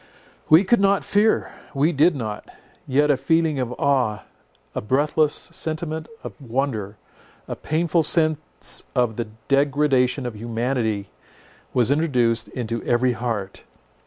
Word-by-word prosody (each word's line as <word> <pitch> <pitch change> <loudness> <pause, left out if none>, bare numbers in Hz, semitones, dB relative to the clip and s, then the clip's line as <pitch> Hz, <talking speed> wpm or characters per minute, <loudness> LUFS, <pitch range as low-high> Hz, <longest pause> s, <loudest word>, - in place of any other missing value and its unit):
We 160 +5 +7
could 235 +4 +3
not 200 0 +3
fear—we 185 -7 0
did 160 +2 +3
not. 110 -5 -5 0.4
Yet 145 +3 +3
a 140 - +2
feeling 160 +1 +1
of 125 -2 -2
awe, 125 -6 +1 0.5
a - - -3
breathless 145 +6 +2
sentiment 160 -1 -4
of - - -7
wonder, 115 -5 -2 0.5
a - - -4
painful 165 +2 0
sense 155 -1 0
of 120 -3 +1
the 120 -1 -3 0.2
degradation 140 -2 +2
of 120 -3 -4
humanity, 115 -2 -2 0.6
was 125 0 +2
introduced 125 -7 +2
into 115 -2 -4
every 125 +1 +2
heart. 110 -5 -4
135 Hz, 125 wpm, -22 LUFS, 120-155 Hz, 0.6 s, We